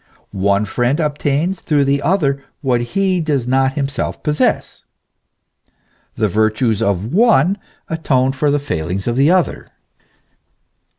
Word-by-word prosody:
One 100 +1 +1
friend 120 - 0
obtains 150 +3 -1
through 145 -3 +1
the 140 +1 +1
other 140 -7 0 0.2
what 125 -4 +1
he 185 +7 0
does 145 -6 -1
not 130 +1 +1
himself 140 -1 -3
possess. 150 -1 -1 1.3
The 110 -2 +1
virtues 110 +2 +1
of 100 +1 -1
the - - -3
one 200 - +4 0.3
atone 135 -5 +1
for 135 +2 0
the 145 - +2
failings 90 - -3
of 120 - 0
the 140 +4 +3
other. 180 -1 +1
135 Hz, 130 wpm, -17 LUFS, 115-150 Hz, 1.3 s, one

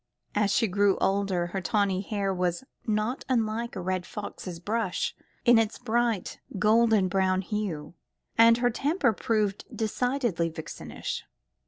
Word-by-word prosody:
As 205 -1 +2
she 225 +3 +3
grew 200 0 +3
older, 195 -3 +1
her 190 - -1
tawny 195 0 +1
hair 200 -1 -1
was 180 +2 -1 0.2
not 215 +4 0
unlike 230 -1 0
a - - -3
red 185 0 -1
fox's 185 -3 -7
brush 210 0 -1 0.3
in 240 -2 +7
its 225 -1 0
bright 235 -3 0 0.2
golden 215 -1 +4
brown 190 0 +1
hue, 190 -7 -3 0.4
and 230 0 +7
her 245 0 +2
temper 280 0 +1
proved 210 -2 0
decidedly 230 -6 0
vixenish. 160 -1 -6
210 Hz, 135 wpm, -28 LUFS, 185-230 Hz, 0.4 s, in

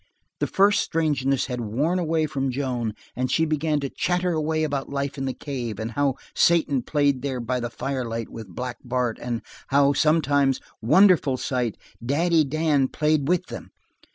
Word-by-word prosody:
The - - 0
first 200 +1 +3
strangeness 140 -5 0
had 125 -2 -4
worn 140 - 0
away 160 -2 +1
from 135 -3 -2
Joan 125 -4 -2 0.2
and 130 +1 -1
she 160 - +2
began 155 -1 0
to 140 - -3
chatter 180 0 0
away 155 0 0
about 140 -3 -2
life 140 0 -2
in 135 -2 -3
the 130 - -2
cave, 125 -6 -5
and 110 +1 -3
how 140 +1 +1 0.2
Satan 155 -6 +3
played 140 -1 +1
there 135 -3 -2
by 125 +1 -2
the 120 0 -3
firelight 115 -3 -3
with 110 -2 -8
Black 125 +7 -5
Bart, 125 -2 -1
and 120 -2 -3 0.2
how, 140 +1 +4
sometimes 145 -3 +2 0.2
wonderful 150 - +5
sight! 125 -4 -2 0.3
Daddy 160 +5 +2
Dan 150 -1 +1
played 150 0 +1
with 180 +1 +1
them. - - -8
140 Hz, 170 wpm, -24 LUFS, 125-155 Hz, 0.3 s, wonderful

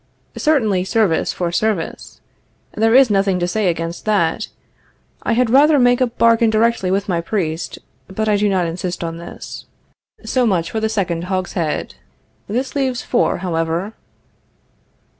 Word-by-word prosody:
Certainly, 220 -12 +1
service 195 -4 +1
for 175 -2 -3
service. 195 -1 -2 0.5
There 225 +2 +2
is 265 -4 +6
nothing 195 -2 +2
to 175 - 0
say 205 +2 0
against 165 0 -3
that. 195 -7 +1 0.7
I - - 0
had 240 -1 +2
rather 290 +3 +6
make 245 0 +3
a 255 - +4
bargain 230 -1 +3
directly 220 -3 +1
with 195 +2 0
my 175 -3 0
priest, 165 -3 -3 0.3
but 215 +3 -3
I 210 - +3
do 205 0 +2
not 185 -3 +1
insist 175 +1 -4
on 165 0 -5
this. 170 - -9 0.6
So 255 -2 +1
much 175 -5 0
for 220 - -1
the 220 0 0
second 180 -6 -2
hogshead. 180 -4 -2 0.6
This 255 +5 -2
leaves 260 -3 -1
four, 240 - +1
however. 165 +4 -2
200 Hz, 150 wpm, -19 LUFS, 175-230 Hz, 0.7 s, is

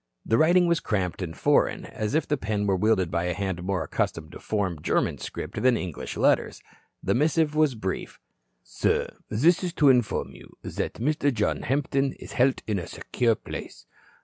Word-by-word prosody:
The 115 - +2
writing 175 +3 +5
was 170 -1 +2
cramped 95 -4 -2
and 80 -3 -5
foreign, - - +2
as 110 +6 -3
if 155 - +1
the 150 - +1
pen 105 -4 -2
were 100 -1 +2
wielded 95 -3 +2
by 85 +1 0
a 90 -1 -1
hand 95 -3 -3
more 90 -2 -1
accustomed 80 0 -2
to - - -10
form 95 -7 -2
German - - 0
script - - -5
than 125 -2 +4
English 90 -5 -5
letters. - - +2 0.4
The - - +1
missive 155 +2 +2
was 155 -4 +2
brief: 95 -4 -4 0.4
"Sir, - - -1
this 160 - +3
is 175 -2 -2
to 145 -5 +4
inform 125 -5 +2
you - - -15
that - - -3
Mr. 145 +3 +1
John 105 -4 0
Hampton 135 +1 0
is - - -11
held 130 +1 +2
in 105 -3 -1
a 85 - -6
secure 115 -2 0
place. - - -8
110 Hz, 185 wpm, -26 LUFS, 95-145 Hz, 0.4 s, writing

